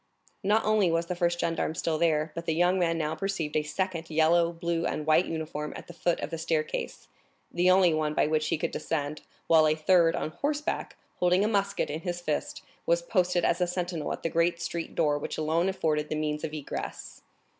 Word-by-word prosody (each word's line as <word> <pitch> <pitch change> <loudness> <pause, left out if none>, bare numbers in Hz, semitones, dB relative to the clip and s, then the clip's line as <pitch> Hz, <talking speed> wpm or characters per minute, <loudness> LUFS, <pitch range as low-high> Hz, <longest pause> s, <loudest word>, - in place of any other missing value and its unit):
Not 210 +3 +2
only 210 -5 +3
was 165 +1 +1
the 180 - -3
first 175 -1 0
gendarme 165 -1 -1
still 160 -1 -1
there, 155 -2 +2
but 170 +1 -6
the 160 - +1
young 175 +2 +3
man 165 -2 +1
now 155 -1 -1
perceived 165 -2 -3
a 155 - +3
second 165 +1 -3
yellow, 165 +2 +3
blue, 170 0 -2
and 150 - -3
white 155 +3 +4
uniform 155 -2 -4
at - - -8
the 175 - -11
foot 170 0 0
of - - -4
the 165 - -4
staircase, 160 -1 -2 0.4
the 180 +1 +2
only 185 -2 +5
one 155 -1 -1
by - - +3
which 155 0 0
he - - 0
could - - -2
descend, 150 -1 -3 0.2
while 160 -1 +5
a 155 - +3
third, 165 +1 +4
on 155 - -3
horseback, 295 - -2 0.2
holding 180 +3 +3
a - - +2
musket 200 -5 0
in 155 +2 -4
his 175 -1 -3
fist, 290 - -3 0.2
was - - +2
posted 180 - +1
as 175 +2 +1
a 180 - +3
sentinel 175 -2 -3
at - - -5
the 165 - 0
great 170 +1 +1
street 170 -1 -4
door 150 -3 +2
which - - -5
alone 160 +4 +1
afforded 155 -5 -1
the - - -1
means 150 0 -2
of 155 - -3
egress. 150 -2 -6
165 Hz, 215 wpm, -28 LUFS, 155-180 Hz, 0.4 s, only